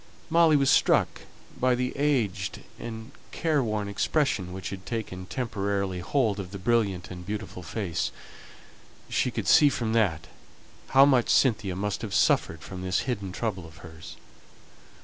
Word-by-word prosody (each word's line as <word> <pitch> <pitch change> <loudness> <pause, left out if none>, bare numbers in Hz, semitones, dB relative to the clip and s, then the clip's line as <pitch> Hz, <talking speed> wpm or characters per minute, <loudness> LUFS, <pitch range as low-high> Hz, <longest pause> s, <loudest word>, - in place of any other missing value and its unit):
Molly 165 -2 +5
was 140 -2 +4
struck - - +3 0.4
by 130 0 +3
the 125 +1 -2
aged 135 -9 -1 0.2
and 110 +1 -7 0.2
careworn 120 -11 0
expression 100 - 0
which 95 0 -6
had 95 -1 -7
taken 95 -6 -5
temporary 100 -6 -2
hold 105 +1 0
of 95 -2 -5
the 100 - -7
brilliant 100 -3 0
and 90 -1 -8
beautiful 100 -1 -6
face; 85 0 -3 1.0
she - - +1
could - - -4
see 145 - +7
from 115 -5 -2
that 95 -9 +1 0.6
how 135 +1 +6
much 130 -4 +3
Cynthia 105 -8 +2
must 100 +1 -2
have 105 -4 -4
suffered 80 - +2
from 95 -1 -8
this 95 +1 0
hidden 115 -6 -3
trouble 95 -2 -3
of 80 - -15
hers. 80 -1 -11
105 Hz, 150 wpm, -27 LUFS, 95-125 Hz, 1.0 s, see